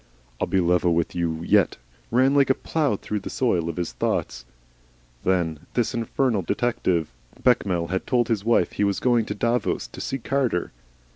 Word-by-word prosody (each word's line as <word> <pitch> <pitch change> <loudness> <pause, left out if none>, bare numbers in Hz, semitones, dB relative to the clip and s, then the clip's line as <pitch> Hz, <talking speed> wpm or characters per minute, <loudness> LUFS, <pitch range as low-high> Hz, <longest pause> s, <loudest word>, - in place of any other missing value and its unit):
"I'll - - 0
be 95 - +1
level 90 -1 +2
with 85 -1 0
you 85 -2 -2
yet," - - +3 0.3
ran 130 +3 +3
like 140 -1 +4
a 135 - +4
plough 150 -9 0
through 105 +1 -4
the 100 - -7
soil 90 -10 0
of 85 - -5
his 85 -8 -3
thoughts. - - -2 0.8
Then 90 -2 +2
there - - -6
was - - -23
this 120 0 +1
infernal 115 -1 0
detective. 90 - 0 0.3
Bechamel 95 -9 +2
had 95 +1 -2
told 120 -3 +2
his 110 -4 0
wife 115 -6 +2
he - - -1
was 100 -1 +1
going 120 -3 +2
to 105 - -4
Davos 115 - 0
to - - -9
see 135 - -2
Carter. 130 -8 -1
105 Hz, 190 wpm, -24 LUFS, 85-120 Hz, 0.8 s, like